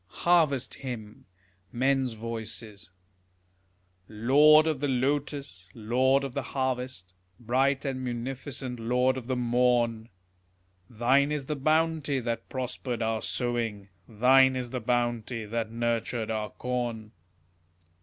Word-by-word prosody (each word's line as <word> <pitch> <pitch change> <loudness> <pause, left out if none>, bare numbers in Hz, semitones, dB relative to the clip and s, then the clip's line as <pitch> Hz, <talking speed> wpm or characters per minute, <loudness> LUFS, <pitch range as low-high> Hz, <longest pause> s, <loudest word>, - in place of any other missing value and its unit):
HARVEST 160 -7 +2
HYMN 115 -5 -7 0.5
Men's 130 0 +1
Voices 110 -2 -6 1.2
Lord 145 +8 +6
of 155 -4 0
the 145 - -1
lotus, 135 -7 -2
lord 130 +5 +2
of 135 -3 -5
the - - -2
harvest, 125 -8 -3 0.3
Bright 135 +4 +1
and 130 -2 -3
munificent 130 +1 -4
lord 125 +3 +1
of 130 -3 -7
the 130 - 0
morn! 120 -2 +1 0.8
Thine 130 +5 +2
is 150 -2 -2
the 150 - -2
bounty 155 -1 +1
that 115 -1 -4
prospered 125 -2 -3
our 110 -1 -1
sowing, 115 -5 -2 0.2
Thine 130 +4 +5
is 125 -2 -4
the 125 -2 -3
bounty 120 -1 -1
that 115 +1 -3
nurtured 115 0 -2
our 110 -1 -2
corn. 120 -4 -4
125 Hz, 115 wpm, -28 LUFS, 115-135 Hz, 1.2 s, Lord